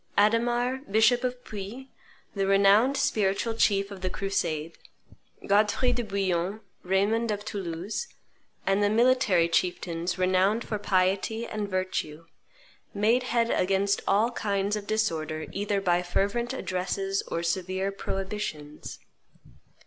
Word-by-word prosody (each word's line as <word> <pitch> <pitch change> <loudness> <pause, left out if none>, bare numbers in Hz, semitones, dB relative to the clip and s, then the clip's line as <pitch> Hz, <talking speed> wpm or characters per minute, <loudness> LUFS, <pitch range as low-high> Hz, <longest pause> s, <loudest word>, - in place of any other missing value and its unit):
Adhdmar, 240 +4 +1
bishop 225 +4 +4
of 250 0 -3
Puy, 215 +6 -8 0.4
the 195 -1 -1
renowned 200 +7 +5
spiritual 225 -5 +1
chief 200 -2 +2
of 195 -2 -8
the 185 - -1
crusade, 165 -5 -2 0.7
Godfrey 210 +5 +3
de 240 - -1
Bouillon, 195 -1 -1 0.2
Raymond 205 +5 +1
of 205 0 -3
Toulouse, 195 - -4 0.6
and 195 +1 +2
the 205 - +3
military 220 -6 +3
chieftains 175 0 -1
renowned 185 +5 +2
for 210 - -4
piety 195 +4 +1
and 210 -3 -4
virtue 185 -4 -3 0.7
made 220 +5 +3
head 235 -1 +2
against 195 +2 +1
all 215 +5 +3
kinds 200 -3 -1
of 205 -1 -6
disorder 160 -8 -1
either 205 0 -1
by 175 -2 +2
fervent 200 +7 -1
addresses 195 -2 -2
or 170 - -3
severe 185 +2 -1
prohibitions. 190 -7 -5
200 Hz, 120 wpm, -27 LUFS, 185-220 Hz, 0.7 s, renowned